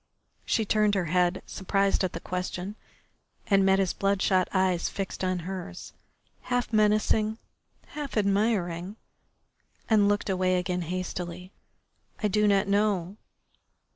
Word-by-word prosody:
She 225 - +1
turned 210 0 +2
her 190 -3 0
head, 180 0 +2
surprised 195 +1 0
at 185 - -1
the 170 - -4
question, 180 +2 -4 0.7
and 195 -2 +3
met 190 0 +4
his 195 -2 +1
bloodshot 195 -2 +1
eyes 185 -2 +1
fixed 195 -1 -5
on 185 0 0
hers, 185 -1 -7 0.5
half 245 -2 -2
menacing, 215 0 +2 0.5
half 290 -5 -6
admiring, 200 -3 0 0.9
and 210 -3 +4
looked 205 +1 0
away 185 0 +1
again 180 0 -1
hastily. 180 +1 -5 0.7
"I 210 - +3
do 210 +2 +2
not 200 -1 +3
know." 200 -2 +1
195 Hz, 125 wpm, -27 LUFS, 185-210 Hz, 0.9 s, met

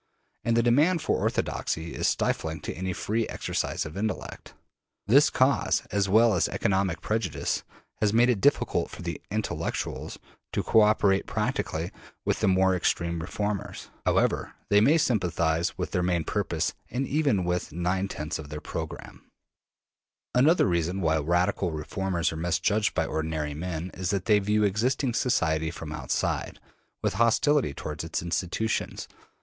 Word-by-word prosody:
And 115 0 +1
the 115 - +4
demand 150 +8 +3
for - - +1
orthodoxy 80 +1 -2
is - - 0
stifling 80 0 0
to - - -4
any 95 +3 -3
free 110 +5 -1
exercise - - -2
of 75 - -8
intellect. 105 +2 -4 0.5
This 140 +8 +6
cause, 130 +2 +2
as 100 -1 +1
well 110 +2 +5
as 90 - +2
economic 95 -3 0
prejudice, 110 -3 -1 0.4
has 105 -1 +2
made 120 +3 +5
it 120 -6 +1
difficult 145 - +2
for - - -9
the - - -4
``intellectuals'' - - -3 0.4
to - - 0
co 110 - +5
operate 105 -2 +3
prac - - 0
tically 80 +3 -3 0.3
with - - 0
the - - +2
more 95 0 +4
extreme 85 -1 0
reformers, 105 +4 -4
however - - +1
they 105 0 +5
may 145 +9 +5
sympathize 85 - +1
with - - -3
their 90 - +1
main 90 -2 +1
purposes - - -1 0.2
and 130 +2 -1
even 140 - +1
with 90 -1 -2
nine 90 +4 -1
tenths 80 -3 -4
of 75 -2 -8
their 75 +1 -5
program. - - -7 1.0
Another 150 +8 +5
reason 85 +1 0
why 80 -2 +2
radical 85 +4 +1
reformers 85 +3 -2
are 80 - -5
misjudged 90 +5 +1
by - - +1
ordinary 80 -1 -2
men 85 +2 -4
is 90 -1 -3
that 100 -2 -1
they 105 -2 +5
view 105 +1 +1
existing 120 +6 +1
society 80 -11 +1
from 80 -2 -7
outside, 80 0 -2 0.4
with - - +1
hostility 135 - +3
towards 75 +2 -5
its 80 0 -3
institutions. 90 +6 -2
95 Hz, 155 wpm, -27 LUFS, 85-110 Hz, 1.0 s, This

